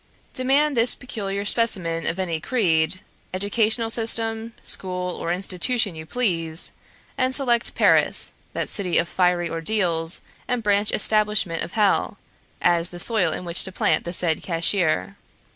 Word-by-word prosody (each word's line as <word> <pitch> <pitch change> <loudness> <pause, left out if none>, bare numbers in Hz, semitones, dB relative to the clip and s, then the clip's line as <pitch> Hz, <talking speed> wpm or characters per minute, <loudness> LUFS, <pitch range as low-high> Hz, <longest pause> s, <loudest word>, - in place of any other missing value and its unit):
Demand 275 +3 +1
this 235 +1 +3
peculiar 200 -5 -5
specimen 185 -8 +1
of 170 - -2
any 175 -4 -2
creed, 175 -5 0 0.3
educational 220 +3 0
system, 225 0 0
school, 180 -1 -1
or 170 - -4
institution 190 +4 0
you 160 0 -10
please, 165 -9 -1 0.5
and 255 0 +2
select 240 -4 +1
Paris, - - +4 0.2
that - - -3
city 185 -4 +1
of 165 - +1
fiery 180 0 +1
ordeals 165 -1 -1 0.3
and 245 -2 -2
branch 205 0 +1
establishment 210 -6 +2
of - - -6
hell, 210 -3 +1 0.5
as 175 0 +2
the 175 - -10
soil 185 -2 +1
in 180 - -5
which 170 +1 0
to 190 - -5
plant - - 0
the 175 - -5
said 170 -3 +1
cashier. 165 - 0
190 Hz, 145 wpm, -23 LUFS, 170-225 Hz, 0.5 s, Paris